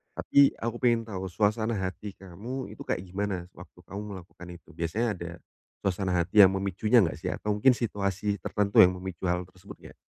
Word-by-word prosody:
Tapi 140 -1 +4
aku 115 +1 -2
pengen 120 -2 +3
tahu 95 -3 -5
suasana 110 +3 +1
hati 95 +2 -5
kamu 105 +8 -7
itu - - -9
kayak - - -1
gimana, 95 -1 -3
sewaktu - - -15
kamu 100 +1 -6
melakukan 90 -1 -12
itu? 85 - -16
Biasanya 85 +8 -1
ada 85 0 -6 0.5
suasana 95 0 -1
hati 90 +4 +6
yang 95 - +3
memicunya 100 +4 +2
nggak 85 - -2
sih? - - -3
Atau 105 -1 -2
mungkin 125 +5 +5
situasi 100 -2 -1
tertentu 100 -1 +1
yang 90 0 +4
memicu 90 -1 -6
hal 90 0 +1
tersebut 95 +1 -14
nggak? - - -14
100 Hz, 185 wpm, -28 LUFS, 90-110 Hz, 0.5 s, hati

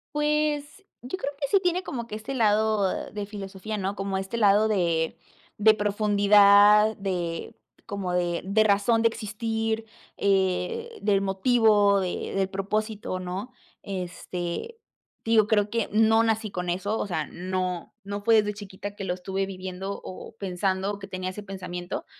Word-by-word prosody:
Pues 300 +3 0 0.2
yo 250 +10 -5
creo 285 -6 -3
que 280 - -1
sí 395 - +5
tiene 360 0 0
como 235 -3 -5
que 215 - -6
este 220 +6 -5
lado 215 -4 +1
de 205 -1 -4
filosofía, 200 +1 -6
¿no? 195 0 -2
Como 195 -1 -2
este 195 +4 -4
lado 210 0 +5
de 170 -6 0 0.4
de 215 +1 +7
profundidad 205 0 +5
de 175 -4 -3 0.3
como 195 -3 -3
de 175 -1 0
de 200 +4 +3
razón 215 +2 +3
de 230 - +5
existir, 225 0 -2 0.3
eh, 200 - 0
del 200 -1 +2
motivo, 205 0 +3
de 185 -2 -3
del 195 -1 +1
propósito, 205 0 -2
¿no?, 185 +6 -5 0.3
este, 180 - -5 0.5
digo, 220 -2 +4
creo 210 -2 +2
que 230 0 -1
no 225 +1 +5
nací 220 -2 0
con 180 -1 -3
eso, 200 +5 -1
o - - -2
sea, 160 -5 -2
no 180 -1 -3
no 200 +1 -5
fue 225 +2 +4
desde 210 -1 +3
chiquita 205 0 -8
que 200 - -6
lo 180 - -1
estuve 190 +2 -3
viviendo 190 +1 -6
o 185 +4 -9
pensando, 190 +1 -1
o 205 - -7
que 195 - -8
tenía 185 -1 -4
ese 205 +3 -7
pensamiento, 180 -2 -6
205 Hz, 160 wpm, -26 LUFS, 190-220 Hz, 0.5 s, de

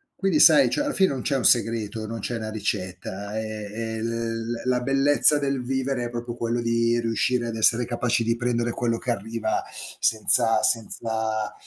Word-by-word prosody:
quindi 190 -6 0
sai, 155 -1 +7
cioè 295 - -1
alla 285 -1 -2
fine 190 -1 +3
non 135 -3 -4
c'è 140 - 0
un 130 - -1
segreto, 115 -2 +2
non 115 +1 -6
c'è 120 +3 -4
una 110 -1 -5
ricetta, 100 -1 -5
è 110 -1 -5
è 110 +1 -5
l 115 0 -3
la 120 - -4 0.2
la - - -3
bellezza 135 +3 +3
del 140 -2 -2
vivere 130 0 -2
è - - -4
proprio 120 0 -6
quello 120 +1 -2
di 115 0 +1
riuscire 120 +1 0
ad 115 - -4
essere 115 +2 +3
capaci 120 -1 -1
di 115 +1 0
prendere 120 -1 -1
quello 115 0 -1
che 120 - -3
arriva 110 0 -2 0.4
senza 115 0 +3
senza 110 -1 -1
115 Hz, 185 wpm, -24 LUFS, 110-125 Hz, 0.4 s, sai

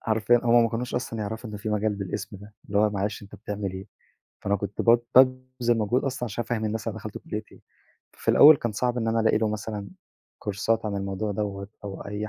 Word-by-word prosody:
حرفيًا 115 +2 +2
هُم 120 0 +6
ما - - +2
كانوش 125 +2 -3
أصلًا 120 -2 -3
يعرفوا 110 +2 -5
إن 105 - -6
في 105 +2 -5
مجال 105 0 0
بالاسم 100 +1 -5
ده، 105 +2 -14
اللي 100 -1 0
هو 105 0 +4
معلش 100 0 -2
أنت 100 0 -12
بتعمل 100 -1 -4
إيه، 95 +1 -7 0.5
فأنا 100 +1 +1
كنت 100 0 -4
ب 115 0 +5 0.2
بابذل 130 -2 +4
مجهود 115 +4 +1
أصلًا 130 -2 -2
عشان 120 +1 -3
أفهِّم 110 -1 -2
الناس 110 +1 -2
أنا 110 - -4
دَخَلت 110 -1 -7
كلية 105 0 -5
إيه، - - -17 0.5
ففي - - -10
الأول 155 +1 +9
كان 120 -4 -3
صعب 125 +3 0
إن 115 -1 -1
أنا 115 0 +2
ألاقي 110 -1 +3
له 110 -1 +1
مثلًا 105 -1 -4 0.5
كورسات 110 +2 -1
عن 100 -1 -2
الموضوع 100 +2 -2
دوَّة، 100 -1 -3 0.2
أو 100 -1 -6
أي 105 +1 -4
110 Hz, 220 wpm, -26 LUFS, 100-115 Hz, 0.5 s, الأول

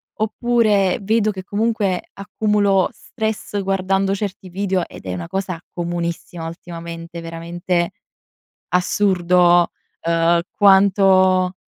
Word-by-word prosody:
oppure 215 -3 +2
vedo 215 +1 +2
che 190 -2 -7
comunque 205 -2 0
accumulo 200 -1 +1
stress 220 -3 -4
guardando 195 0 0
certi 195 -2 -5
video 190 -1 -1
ed - - -13
è 90 - -3
una 85 -2 -5
cosa 185 -3 -3
comunissima 170 -1 -4
ultimamente, 170 0 -8
veramente 170 +1 -2 0.8
assurdo, 180 -2 +3 0.3
uhm, 170 0 +2
quanto 190 -2 +4
185 Hz, 100 wpm, -20 LUFS, 175-200 Hz, 0.8 s, quanto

